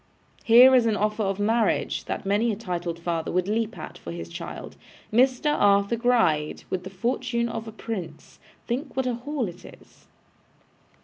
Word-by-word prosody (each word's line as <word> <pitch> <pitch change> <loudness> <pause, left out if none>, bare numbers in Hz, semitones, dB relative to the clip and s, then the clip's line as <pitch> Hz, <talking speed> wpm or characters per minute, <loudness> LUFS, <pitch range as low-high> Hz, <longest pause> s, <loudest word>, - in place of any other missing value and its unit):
Here 245 +3 +8
is 245 -3 +5
an 215 -2 +1
offer 210 +2 0
of 195 -2 0
marriage, 220 +3 +1
that - - -4
many 210 +4 +2
a - - -2
titled 175 -5 -4
father 170 -1 -3
would 185 +1 0
leap 225 +2 -1
at, - - -9
for 85 - -8
his 85 0 -7
child. - - -8 0.4
Mr 260 +5 +3
Arthur 200 +2 +3
Gride, 225 -11 +1
with 185 -1 -2
the 190 - -7
fortune 235 +4 -1
of 225 -1 -5
a - - -6
prince. 190 -8 -7 0.3
Think 255 +6 -4
what 265 -1 0
a 250 - 0
haul 255 0 -3
it 175 - -10
is! - - -16
220 Hz, 175 wpm, -25 LUFS, 185-235 Hz, 0.4 s, Here